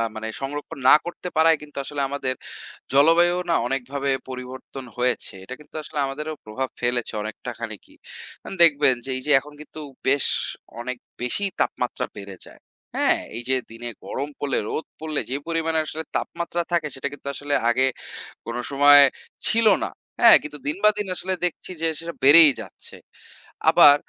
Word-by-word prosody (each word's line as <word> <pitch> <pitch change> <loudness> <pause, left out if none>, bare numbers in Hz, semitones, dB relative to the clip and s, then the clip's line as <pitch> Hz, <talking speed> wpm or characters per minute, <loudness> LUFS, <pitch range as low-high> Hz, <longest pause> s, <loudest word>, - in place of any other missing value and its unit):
মানে 110 0 -5
সংরক্ষণ 145 +3 -5
না - - +10
করতে 175 +1 -6
পারায় 160 0 +5
কিন্তু 150 -1 -13
আসলে 145 +1 -4
আমাদের 135 -2 -2 0.6
জলবায়ুও 170 +5 +5
না 170 - +3
অনেকভাবে 135 +2 -2 0.2
পরিবর্তন 130 +1 -8
হয়েছে। 125 0 -1
এটা 125 +7 -8
কিন্তু 150 - -18
আসলে 150 - -5
আমাদেরও 150 +3 -5
প্রভাব 130 +5 -3
ফেলেছে 120 -1 -1
অনেকটা 110 +3 -6
খানিকই। 110 -3 -8 0.5
আন - - -7
দেখবেন 145 -5 +5
যে, - - -6
এই - - -5
যে - - +2
এখন 145 +2 -14
কিন্তু 155 - -11 0.3
বেশ 140 +1 +3 0.5
অনেক 125 +1 -4 0.2
বেশিই 190 +11 -1
তাপমাত্রা 125 - -1
বেড়ে 100 -2 -9
যায়। - - -15 0.4
হ্যাঁ? - - +3 0.2
এই 120 - -5
যে 130 - +4 0.2
দিনে 115 +1 -7 0.2
গরম 140 +2 -4
পড়লে, 140 -2 -1
রোদ 160 - -3
পড়লে 155 -2 -2
যে 130 - -2
পরিমাণে 165 -1 0
আসলে 160 +1 -5
তাপমাত্রা 170 0 -3
থাকে 170 -3 +1
সেটা 135 +1 -3
কিন্তু 140 -1 -11
আসলে 145 +1 -3 0.2
আগে 130 +2 +3 0.6
কোনো 115 +1 -4
সময় 145 +1 +8 0.5
ছিল 230 0 +2 0.2
না। - - -2 0.3
হ্যাঁ? - - +10
কিন্তু 150 0 -7
দিন 150 - -1
বা 215 - +8
দিন 210 -1 -2
আসলে 185 +1 -2
দেখছি 175 +1 -3
যে 165 - +2
সেটা 170 0 -6
বেড়েই 150 +3 +10
যাচ্ছে। 95 - -10 0.8
আবার 145 - +8
145 Hz, 165 wpm, -23 LUFS, 130-160 Hz, 0.8 s, না